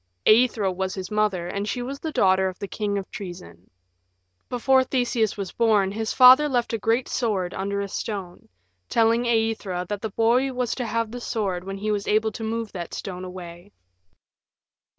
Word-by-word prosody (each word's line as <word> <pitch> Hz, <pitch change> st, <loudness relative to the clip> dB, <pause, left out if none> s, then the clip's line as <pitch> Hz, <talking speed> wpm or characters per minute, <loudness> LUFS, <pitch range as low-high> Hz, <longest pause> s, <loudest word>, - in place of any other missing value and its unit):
Aethra 220 Hz, -3 st, +4 dB
was 190 Hz, 0 st, -3 dB
his 190 Hz, 0 st, -6 dB
mother, 210 Hz, -5 st, 0 dB
and 200 Hz, +3 st, -3 dB
she 245 Hz, -, -2 dB
was 275 Hz, +3 st, -6 dB
the 320 Hz, -, -4 dB
daughter 190 Hz, -6 st, +3 dB
of 185 Hz, -, -10 dB
the 200 Hz, -, -5 dB
King 205 Hz, 0 st, -2 dB
of 195 Hz, -, -4 dB
Troezen. 135 Hz, -, -9 dB, 0.8 s
Before 260 Hz, +2 st, +3 dB
Theseus 245 Hz, -5 st, 0 dB
was 195 Hz, -2 st, -4 dB
born 210 Hz, -4 st, +2 dB
his 220 Hz, +1 st, -3 dB
father 260 Hz, +4 st, +7 dB
left 245 Hz, -3 st, 0 dB
a 225 Hz, -, -1 dB
great 230 Hz, +4 st, +1 dB
sword 195 Hz, -7 st, -1 dB
under 200 Hz, +1 st, -2 dB
a 200 Hz, -, -3 dB
stone, 195 Hz, -3 st, -6 dB, 0.4 s
telling 230 Hz, +1 st, +3 dB
Aethra 220 Hz, -6 st, 0 dB
that 205 Hz, -1 st, -3 dB
the 220 Hz, -, -3 dB
boy 240 Hz, +6 st, +2 dB
was 250 Hz, -2 st, -1 dB
to 250 Hz, -3 st, -3 dB
have 230 Hz, 0 st, -1 dB
the 245 Hz, +1 st, -6 dB
sword 195 Hz, -7 st, -2 dB
when 195 Hz, 0 st, -5 dB
he 215 Hz, +2 st, -2 dB
was 205 Hz, -1 st, -2 dB
able 220 Hz, +1 st, +2 dB
to 225 Hz, -, -7 dB
move 225 Hz, 0 st, -3 dB
that 175 Hz, -3 st, -6 dB
stone 185 Hz, -2 st, -6 dB
away. 180 Hz, +1 st, -9 dB
210 Hz, 185 wpm, -24 LUFS, 190-235 Hz, 0.8 s, father